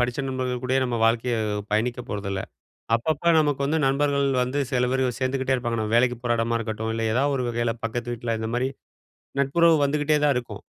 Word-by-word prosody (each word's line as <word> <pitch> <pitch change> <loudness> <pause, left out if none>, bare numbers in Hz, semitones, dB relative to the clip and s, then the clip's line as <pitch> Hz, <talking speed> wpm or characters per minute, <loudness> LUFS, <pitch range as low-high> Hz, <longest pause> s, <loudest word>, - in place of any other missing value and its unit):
படிச்ச 125 0 0
நண்பர்கள் 130 -1 -2
கூடயே 130 +1 +1
நம்ம 120 -2 -1
வாழ்க்கைய 115 +1 +2 0.3
பயணிக்க 115 +4 0
போறதில்ல. 100 -2 -3 0.5
அப்பப்ப 160 +8 +1
நமக்கு 145 -3 0
வந்து 155 +3 +1
நண்பர்கள் 140 +1 +2 0.2
வந்து, 125 +3 -2
செல 125 -1 +2
பேரு 130 -1 +1
சேந்துக்கிட்டே 130 0 0
இருப்பாங்க. 120 -2 -2
நம்ம 110 0 -2
வேலைக்கு 125 +1 +3
போற 120 - +2
எடமா 115 +1 +1
இருக்கட்டும், 110 -1 -3
இல்ல 115 - -2
ஏதாவது 140 +3 +2
ஒரு 125 - -1
வகையில 120 -1 -1
பக்கத்து 120 +1 -3
வீட்ல, 115 -1 -2
இந்த 110 - -3
மாரி 125 +2 +1 0.7
நட்புறவு 165 +5 +4
வந்துகிட்டே 150 +1 +1
தான் 145 - +4
இருக்கும். 120 - -6
125 Hz, 185 wpm, -24 LUFS, 115-135 Hz, 0.7 s, நட்புறவு